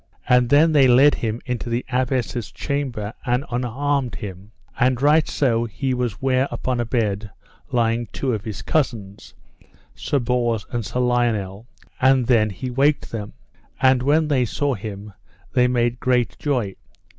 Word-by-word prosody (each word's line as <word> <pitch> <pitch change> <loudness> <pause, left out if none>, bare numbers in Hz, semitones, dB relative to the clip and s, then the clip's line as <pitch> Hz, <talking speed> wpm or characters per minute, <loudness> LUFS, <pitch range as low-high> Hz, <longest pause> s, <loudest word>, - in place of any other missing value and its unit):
And 125 -1 +4
then 150 +4 +5
they 140 -4 +5
led 130 +4 +6
him 115 0 -3
unto 125 -1 -3
the 120 +2 -2
Abbess's 125 -4 -1
chamber 130 -7 -3
and 125 +3 0
unarmed 130 +2 -1
him; 100 -1 -8 0.3
and 125 -1 +2
right 150 +3 +4
so 120 -4 +1
he 130 +4 -2
was 125 -5 -2
ware 130 0 +1
upon 125 -1 -2
a 120 - 0
bed 110 -3 -1 0.4
lying 115 -1 +1
two 130 +4 -2
of 105 -3 -3
his 110 -3 -6
cousins, 110 -10 -2 0.6
Sir 145 - -2
Bors 120 -3 0
and 120 -2 -2
Sir 125 +5 -2
Lionel, 115 -4 0 0.3
and 130 -1 +4
then 115 -3 +3
he 115 +7 -6
waked 140 +3 +1
them; 105 -3 -5 0.5
and 130 -1 +4
when 150 +4 +2
they 135 -4 +2
saw 140 +4 -1
him 105 -1 -7 0.4
they 125 -1 +4
made 120 -1 0
great 125 -2 +1
joy. 125 -10 -1
125 Hz, 155 wpm, -22 LUFS, 115-130 Hz, 0.6 s, led